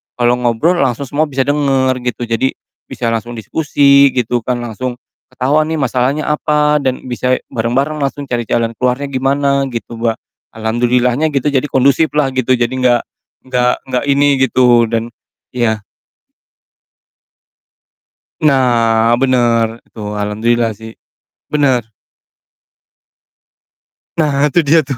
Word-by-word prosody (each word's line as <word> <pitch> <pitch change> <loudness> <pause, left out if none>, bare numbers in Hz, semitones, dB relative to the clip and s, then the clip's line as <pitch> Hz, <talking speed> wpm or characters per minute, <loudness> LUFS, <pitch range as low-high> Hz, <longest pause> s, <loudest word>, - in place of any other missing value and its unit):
kalo 120 0 +2
ngobrol 125 +9 +1
langsung 135 0 0
semua 150 +4 +1
bisa 135 -2 -1
denger 135 -3 +1 0.2
gitu. 120 - -7
Jadi 115 +3 +1 0.4
bisa 120 - -4
langsung 115 +1 -3
diskusi 140 +3 +3
gitu 120 -1 -1
kan, 125 +1 -2
langsung 120 +2 -5 0.3
ketahuan 145 +4 +1
nih 160 - -1
masalahnya 135 +4 0
apa, 150 0 +2
dan 130 -1 -1
bisa 125 +1 0
bareng-bareng 130 +7 -1
langsung 140 0 -3
cari 120 -2 -2
jalan 115 -1 0
keluarnya 125 +3 0
gimana 140 +1 +1
gitu, 115 0 -6
Mbak. 115 -1 0 0.4
Alhamdulillahnya 120 +5 +1
gitu, 140 +1 +1
jadi 135 0 +1
kondusif 140 +3 +2
lah 150 -3 +2
gitu, 130 0 +1
jadi 120 -1 0
gak 125 -2 +2 0.5
gak 125 -1 +2 0.2
gak 125 - -1
ini 140 0 +3
gitu 125 -2 +4
dan 115 +1 -2 0.5
iya. 110 -3 0 2.6
Nah, 120 -4 +3
bener, 120 -3 +1
itu, - - -16
alhamdulillah 110 +3 0
sih, 110 +1 -10 0.6
bener. 130 -6 +1 2.3
Nah, 150 -2 +2
tuh 165 +2 +1
dia 160 +3 +4
tuh, 135 -3 -5
125 Hz, 125 wpm, -15 LUFS, 120-140 Hz, 2.6 s, gitu